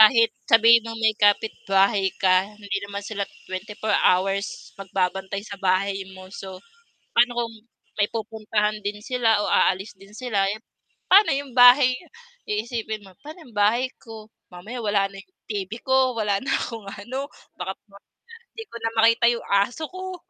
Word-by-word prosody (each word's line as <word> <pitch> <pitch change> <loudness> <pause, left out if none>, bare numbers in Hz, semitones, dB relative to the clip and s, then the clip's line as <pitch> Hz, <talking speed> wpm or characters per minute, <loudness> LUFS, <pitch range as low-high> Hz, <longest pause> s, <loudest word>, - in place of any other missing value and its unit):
Kahit 230 +1 +6 0.2
sabihin 230 +1 +7
nung 230 0 -7
may 220 -1 +2
kapitbahay 200 -1 +2
ka 185 0 +3
hindi 200 -1 -4
naman 200 0 -6
sila 200 -2 -4 0.2
24 210 +3 -4
hours 195 +2 0
magbabantay 190 +1 -2
sa 200 -2 -9
bahay 195 +1 +1 0.2
mo 185 - -11
so, 190 -2 -8 0.6
pa'no 240 +1 +4
kung 230 -1 -2 0.5
may 205 - +3
pupuntahan 215 -1 -2
din 205 +1 -2
sila 235 -4 +2
o - - -2
aalis 195 +3 +2
din 195 +2 -17
sila 210 -6 0
'yung 215 +3 -5 0.4
pa'no 400 +3 +6
'yung 280 -2 -5
bahay 250 +1 +8 0.6
iisipin 220 0 -3
mo, 190 - -15
pa'no 310 +3 -11
'yung 245 - -17
bahay 230 +5 +2
ko? 220 -2 -11 0.2
Mamaya 210 +8 -8
wala 205 -1 +2
na 195 - -10
'yung 370 - -21 0.2
TV 200 -3 -4
ko, 260 -2 +2
wala 205 -3 0
na 270 - -7
akong 225 -4 -4
ano. 255 +8 -6 0.3
Baka 190 - -3 0.2
mamaya 200 0 -21 0.4
'di 450 - -6
ko 235 - -8
na 225 0 -1
makita 230 +1 +4
'yung 235 - -5
aso 200 +10 +1
ko. 370 0 -7
215 Hz, 165 wpm, -24 LUFS, 195-235 Hz, 0.6 s, bahay